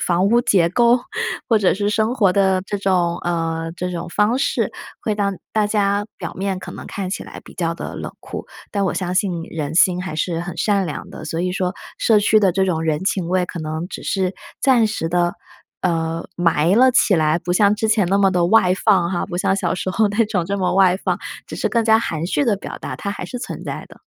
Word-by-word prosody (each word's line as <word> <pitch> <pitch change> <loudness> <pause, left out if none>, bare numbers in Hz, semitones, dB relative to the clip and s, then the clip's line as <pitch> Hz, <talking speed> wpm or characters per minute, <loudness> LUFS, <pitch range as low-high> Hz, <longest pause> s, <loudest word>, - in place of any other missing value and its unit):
房 180 +2 +2
屋 235 +4 +4
结 180 -7 +3
构， 235 +6 +4 0.5
或 230 - +4
者 195 - +3
是 205 +1 -1
生 220 +3 +1
活 200 -7 +3
的 190 -2 +3
这 205 - -2
种， 180 -3 +1
呃， 165 -1 -2
这 180 +1 -3
种 170 -1 -5
方 210 +6 +2
式， 275 - 0 0.3
会 215 - -1
让 200 -2 -1 0.2
大 215 -1 +3
家 205 -1 +1
表 - - -6
面 190 -1 -2
可 - - -8
能 - - -9
看 190 -2 -4
起 190 - -4
来 - - -10
比 - - -14
较 165 -1 -1
地 - - -6
冷 - - -6
酷， - - -7 0.2
但 200 -1 0
我 185 - 0
相 180 -1 -2
信 180 -3 0
人 155 -1 -4
心 180 +1 +4
还 180 -4 -5
是 165 +2 -1
很 175 -1 -5
善 200 0 +2
良 150 -5 -5
的。 - - -9
所 165 - -3
以 180 +1 0
说 180 0 -1 0.2
社 220 -2 +4
区 215 +1 +4
的 195 -3 +3
这 190 +2 +1
种 165 -3 0
人 155 0 0
情 190 -2 -1
味 185 -1 +1
可 170 - -7
能 155 +2 -4
只 - - -7
是 190 -1 -1 0.3
暂 250 -5 +4
时 185 -6 -2
地， 175 0 +1 0.5
呃， 165 -1 -1
埋 170 +1 +2
了 255 +3 +6
起 235 -4 +4
来， 155 -1 +2
不 175 +1 -2
像 205 +2 +4
之 220 +1 -1
前 215 -3 +3
那 195 - +2
么 195 -1 +4
地 180 -2 +2
外 185 -1 +4
放 190 -4 +2
哈， 175 - -1
不 175 - -5
像 190 - +1
小 195 - 0
时 185 - -4
候 210 +2 +2
那 215 +2 +1
种 195 -5 -1
这 200 +3 -2
么 185 -1 0
外 190 -1 +4
放， - - -1 0.3
只 - - -7
是 - - -1
更 235 - +2
加 220 0 +5
含 165 -7 -2
蓄 285 +10 +1
地 230 -5 +2
表 200 - -7
达， - - -6
它 200 - -4
还 195 - -5
是 250 - -6
存 245 - -6
在 - - -5
的。 - - -17
185 Hz, 260 characters per minute, -20 LUFS, 175-205 Hz, 0.5 s, 了